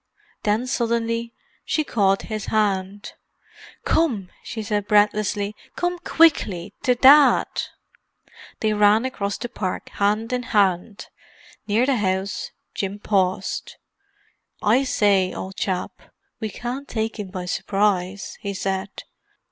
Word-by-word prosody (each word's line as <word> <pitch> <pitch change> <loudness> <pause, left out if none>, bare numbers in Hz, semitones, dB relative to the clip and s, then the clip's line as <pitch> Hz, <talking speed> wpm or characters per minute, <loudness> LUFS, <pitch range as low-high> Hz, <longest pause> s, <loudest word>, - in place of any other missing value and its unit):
Then, 215 +4 +1
suddenly, 235 -2 -1 0.3
she 310 - 0
caught 195 -8 +1
his 215 -2 -5
hand. 200 -2 -1 0.7
"Come!" 230 - +1
she 220 -2 -6
said 205 -1 -2
breathlessly. 210 0 +2 0.2
"Come 355 0 -1
quickly—to 250 - +2
Dad!" 275 +3 +7 1.2
They 215 -1 +2
ran 210 +3 +4
across 200 -6 -3
the - - -4
park, 190 -5 -4
hand 215 +4 0
in 250 - 0 0.2
hand. 195 +1 +1 0.6
Near 220 +4 +3
the 270 -2 +2
house 190 -1 -1 0.2
Jim 195 0 -3
paused. 190 -2 -1 0.8
"I 240 +6 +3
say, 200 -6 +2
old 190 +1 -6
chap, 185 -2 -2 0.5
we 220 - -3
can't 245 +7 -5
take 220 0 -3
him 205 - -4
by 185 -1 -5
surprise," 195 0 -1
he 200 -1 -4
said. 195 +1 -3
210 Hz, 115 wpm, -23 LUFS, 195-230 Hz, 1.2 s, Dad